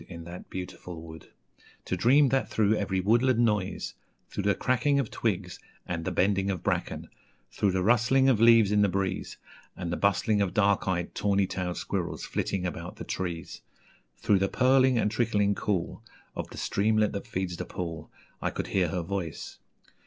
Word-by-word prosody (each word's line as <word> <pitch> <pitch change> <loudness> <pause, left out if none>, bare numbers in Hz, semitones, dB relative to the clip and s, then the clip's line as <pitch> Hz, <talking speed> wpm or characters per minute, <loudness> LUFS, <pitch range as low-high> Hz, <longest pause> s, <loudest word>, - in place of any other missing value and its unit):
In 85 -2 -8
that 85 +2 -10
beautiful 90 -2 -7
wood, 80 -1 -11 0.6
To - - -1
dream 130 +9 +4
that 135 +1 0
through 110 -1 +2
every 100 -3 -1
woodland 120 +6 +3
noise, 105 -5 0 0.4
Through 100 - -3
the 100 -2 +3
cracking 130 +6 +1
Of 130 -6 -2
twigs - - -2 0.3
and 85 -2 -3
the 95 - -1
bending 95 +2 +1
of 95 -3 -3
bracken, - - -2 0.4
Through 100 -3 0
the 95 -1 0
rustling 120 +5 +4
Of 120 -5 +3
leaves 115 -3 +6
in 105 0 +4
the 100 - +4
breeze, 95 0 -2 0.4
And 85 -2 -3
the - - -1
bustling 100 +1 +2
Of 95 -3 -1
dark 100 -2 +2
eyed, 90 -2 -1
tawny 100 -1 +1
tailed 90 -1 -3
squirrels - - -3
flitting 95 -2 -2
about 85 -1 -5
the - - -8
trees, 85 -4 -5 0.6
Through 100 -2 +2
the 95 0 +1
purling 130 0 +4
and 105 -2 +1
trickling 105 -3 +1
cool 95 -2 -2 0.3
Of - - -5
the - - -11
streamlet 110 +1 +1
that 100 +4 -5
feeds 95 -5 -3
the - - -4
pool, 85 -3 -6 0.3
I - - 0
could - - -4
hear 95 -2 +2
her 85 +2 -2
voice. 85 -2 -5
100 Hz, 180 wpm, -28 LUFS, 90-110 Hz, 0.6 s, leaves